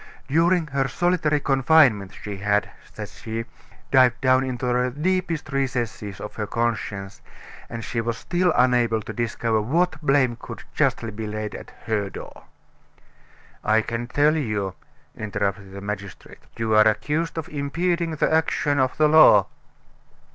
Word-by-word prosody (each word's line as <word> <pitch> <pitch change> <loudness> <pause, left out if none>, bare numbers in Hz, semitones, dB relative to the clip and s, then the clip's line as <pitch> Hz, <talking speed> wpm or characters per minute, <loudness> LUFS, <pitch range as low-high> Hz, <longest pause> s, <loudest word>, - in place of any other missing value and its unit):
During 165 +4 +3
her 135 -2 -1
solitary 175 -2 +1
confinement, 135 -8 +3
she 100 -1 -5
had, 105 +1 0 0.2
said - - -7
she, 115 +1 -6 0.5
dived 130 -2 +5
down 130 0 +3
into 130 -1 -4
the 125 +1 +1
deepest 165 +1 -2
recesses 120 -7 -2
of 105 +1 -7
her 105 -1 -3
conscience, 110 -4 -3 0.5
and 115 -1 -6
she 115 +1 -2
was 115 0 -3
still 175 +5 +1
unable 120 -3 +2
to - - -7
discover 115 -1 -1
what 160 +7 0
blame 135 -5 +2
could - - -9
justly 115 - 0
be 110 +1 -6
laid 105 0 -4
at - - -9 0.2
her 105 -3 -1
door. - - -10 1.2
"I 110 +1 +3
can 115 +1 -4
tell 145 +4 +3
you," 105 - -2 0.4
interrupted 100 -2 -3
the 100 +1 -8
magistrate. 100 -1 -7 0.2
"You 115 -1 -1
are 110 0 +6
accused 150 +10 -1
of 160 0 -3
impeding 165 +3 -1
the 155 - +1
action 150 -2 +1
of 130 -1 +1
the 155 0 +5
law." 150 -10 +7
125 Hz, 145 wpm, -23 LUFS, 110-150 Hz, 1.2 s, law